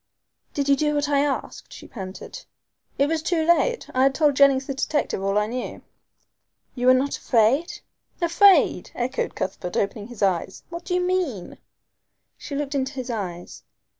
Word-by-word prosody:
"Did 285 -2 -1
you 280 - +5
do 300 +1 0
what 290 0 0
I 285 -1 +3
asked?" 285 -1 -3
she - - -11
panted. 195 - -8 0.5
"It 280 - +3
was 320 +1 -1
too 325 -1 0
late. 345 +9 +2
I 255 - +1
had 270 0 +3
told 295 -2 +3
Jennings 275 -1 +4
the 275 - -3
detective 280 -5 -1
all 195 +1 +1
I 210 - +2
knew." 245 +3 -5 0.9
"You 250 -1 -1
were 255 - +8
not 275 +2 0
afraid?" 250 +8 +1 0.4
"Afraid!" 365 +3 +4
echoed 255 +2 -2
Cuthbert, 180 -1 -4
opening 205 +1 -2
his 235 -4 -6
eyes. 190 -1 -1
"What 340 0 -8
do 360 - -1
you 360 - +2
mean?" 360 - -2 0.8
She 285 - -7
looked 285 0 -3
into 270 0 -1
his 255 -2 -5
eyes. 180 -6 -6
275 Hz, 170 wpm, -24 LUFS, 230-310 Hz, 0.9 s, were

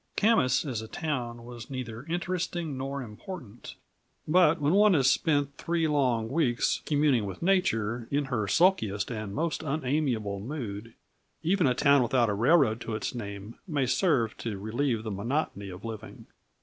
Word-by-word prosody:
Camas 200 - +3
as 125 -6 -3
a 110 - -8
town 120 -6 -4
was 120 0 -9
neither 125 -2 -6
interesting 175 -2 -2
nor 135 +1 -4
important; 120 - -9 0.5
but 165 0 +4
when 145 +3 +2
one 205 -1 +5
has 130 -3 +4
spent 145 -3 +1
three 165 -1 0
long 130 -7 +1
weeks 125 -3 +1
communing 145 -8 +2
with 95 - -7
nature 120 - +1
in 145 0 0
her 120 -6 -1
sulkiest 110 - +2
and 110 -3 -5
most 165 +2 -1
unamiable 135 -8 -1
mood, 115 -3 -6 0.5
even 175 -1 +2
a 125 - +2
town 140 +1 +5
without 120 -2 +2
a - - +1
railroad 120 0 +3
to 115 - -4
its 110 - -3
name 100 -2 -7
may 145 -6 0
serve 130 - +1
to 110 -4 -4
relieve 115 +3 -1
the 110 - -4
monotony 100 -1 -2
of 90 +4 -9
living. 110 -1 -8
130 Hz, 160 wpm, -28 LUFS, 110-155 Hz, 0.5 s, one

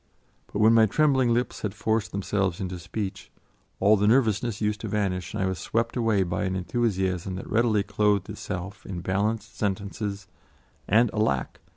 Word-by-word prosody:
But - - -4
when 110 +1 +6
my 110 -1 +6
trembling 130 0 +3
lips 120 +1 -1
had 105 -2 -3
forced 110 +1 0
themselves 100 -2 -1
into 90 -2 -4
speech, 95 +3 -5 0.5
all 105 +3 +5
the 105 +1 +2
nervousness 115 -2 +2
used 105 0 -1
to 110 - -4
vanish 95 -4 -2
and - - 0
I - - +2
was 95 -3 -2
swept 115 +6 -1
away 110 -5 +2
by 85 0 -2
an 95 0 -1
enthusiasm 95 -3 -1
that 95 - -7
readily 110 -2 +2
clothed 105 -1 +1
itself 100 +2 -6
in 90 -3 -6
balanced 105 +4 -1
sentences, 100 0 -3 0.6
and 115 +3 +4
alack! 70 - 0
105 Hz, 170 wpm, -26 LUFS, 95-110 Hz, 0.6 s, when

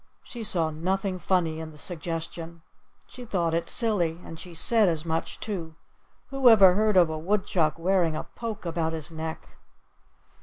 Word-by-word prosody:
She 235 -2 -8
saw 165 -6 +3
nothing 185 +4 -2
funny 170 -4 0
in 160 -1 -6
the 155 - -15
suggestion. 165 0 -6 0.4
She 250 - -11
thought 175 -8 -1
it 165 0 -1
silly; 180 -8 +1
and 165 - -9
she 175 -2 -10
said 215 +4 +3
as 160 -1 -2
much, 165 0 -3
too: 170 -7 -5 0.6
"Who 270 -2 +5
ever 195 -5 +8
heard 210 0 +2
of 170 -3 +5
a 155 - -4
Woodchuck 175 -3 0
wearing 170 -2 +1
a - - -3
poke 225 -4 -7
about 165 -1 -1
his 160 0 -3
neck?" 160 0 -7
170 Hz, 165 wpm, -26 LUFS, 160-195 Hz, 0.6 s, ever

